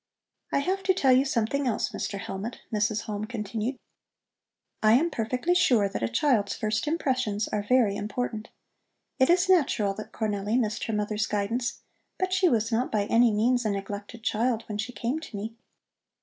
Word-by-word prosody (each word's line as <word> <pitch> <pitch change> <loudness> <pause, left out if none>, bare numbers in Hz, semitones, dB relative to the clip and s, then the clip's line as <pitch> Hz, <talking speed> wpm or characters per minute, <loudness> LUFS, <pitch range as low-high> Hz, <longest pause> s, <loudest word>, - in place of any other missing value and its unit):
"I - - +2
have 380 +6 -1
to 375 -1 +3
tell 270 -7 +3
you 255 +2 +5
something 265 +2 0
else, 225 - 0
Mr. 200 - -4
Hellmut," 195 +4 -5 0.2
Mrs. 210 0 +1
Halm 210 0 -4
continued. 225 +2 -3 1.0
"I 215 0 +5
am 325 +8 +3
perfectly 250 +8 0
sure 245 - +4
that 195 - -5
a 115 - +1
child's 210 - +1
first 215 +4 -1
impressions 255 -9 0
are 210 - -1
very 215 -1 +3
important. 215 +1 -3 0.7
It 260 - +4
is 360 +2 +4
natural 265 - +3
that 215 +2 -8
Cornelli 210 0 -1
missed 215 -3 -1
her 225 - -3
mother's 210 +1 -1
guidance, 225 +4 -2 0.4
but 370 0 -1
she 380 -1 +4
was 225 -3 +1
not 235 +3 0
by 210 -2 +1
any 230 +3 +4
means 240 +4 +2
a 215 - 0
neglected 205 +3 -5
child 230 0 0
when 210 -1 -5
she 220 +4 -3
came 245 +5 -2
to 315 -9 -8
me. 220 +3 -5
225 Hz, 180 wpm, -27 LUFS, 210-255 Hz, 1.0 s, you